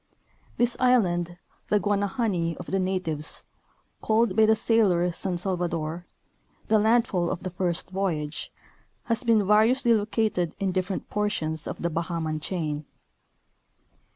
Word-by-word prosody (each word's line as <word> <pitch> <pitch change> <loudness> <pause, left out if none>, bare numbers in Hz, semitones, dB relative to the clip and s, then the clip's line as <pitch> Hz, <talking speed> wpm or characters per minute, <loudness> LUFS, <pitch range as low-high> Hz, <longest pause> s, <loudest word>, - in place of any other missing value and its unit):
This 240 0 +2
island, 175 -9 +2 0.3
the 210 - +3
Guanahani 200 -4 0
of 180 - -8
the 195 - -1
natives, 185 -5 -2 0.6
called 220 -2 +2
by 220 0 +5
the 220 - +5
sailor 205 -6 +3
San 180 +1 -2
Salvador, 175 -2 -2 0.6
the 220 0 +5
landfall 215 -5 +2
of - - -4
the 185 - -4
first 180 0 -2
voyage, 165 -6 -2 0.5
has 230 0 +1
been 230 -3 +4
variousl}^ 230 +4 +4
located 210 -5 0
in 195 -2 0
different 185 +1 -2
portions 160 -7 -1
of - - -6
the 170 - 0
Bahaman 165 -1 -2
chain. 155 -3 -3
185 Hz, 125 wpm, -26 LUFS, 170-215 Hz, 0.6 s, by